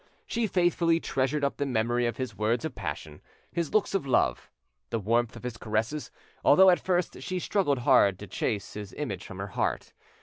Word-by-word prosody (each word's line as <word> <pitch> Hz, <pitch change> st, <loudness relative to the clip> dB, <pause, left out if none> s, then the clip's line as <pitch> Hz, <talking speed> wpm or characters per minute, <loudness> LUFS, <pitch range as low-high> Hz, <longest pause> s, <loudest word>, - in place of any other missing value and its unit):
She 230 Hz, -1 st, -1 dB
faithfully 175 Hz, -3 st, +2 dB
treasured 135 Hz, 0 st, -1 dB
up 140 Hz, -, 0 dB
the 145 Hz, -, -1 dB
memory 120 Hz, 0 st, +1 dB
of 120 Hz, -, -3 dB
his 130 Hz, -1 st, -4 dB
words 115 Hz, +6 st, 0 dB
of 155 Hz, -, -4 dB
passion, -, -, -6 dB, 0.3 s
his 170 Hz, -3 st, -2 dB
looks 215 Hz, -2 st, +2 dB
of 195 Hz, -8 st, -1 dB
love, 130 Hz, -, +1 dB, 0.4 s
the -, -, -1 dB
warmth 115 Hz, +2 st, 0 dB
of -, -, -10 dB
his 125 Hz, -2 st, -5 dB
caresses, 115 Hz, +8 st, -2 dB, 0.3 s
although 190 Hz, +5 st, +7 dB
at 175 Hz, -, +3 dB
first 180 Hz, -7 st, -1 dB
she 185 Hz, +7 st, -3 dB
struggled 180 Hz, -6 st, +1 dB
hard 100 Hz, -5 st, +4 dB
to 105 Hz, -, -8 dB
chase 100 Hz, 0 st, -3 dB
his 105 Hz, -2 st, -7 dB
image -, -, -4 dB
from -, -, -9 dB
her -, -, -5 dB
heart. -, -, -2 dB
130 Hz, 195 wpm, -28 LUFS, 115-170 Hz, 0.4 s, although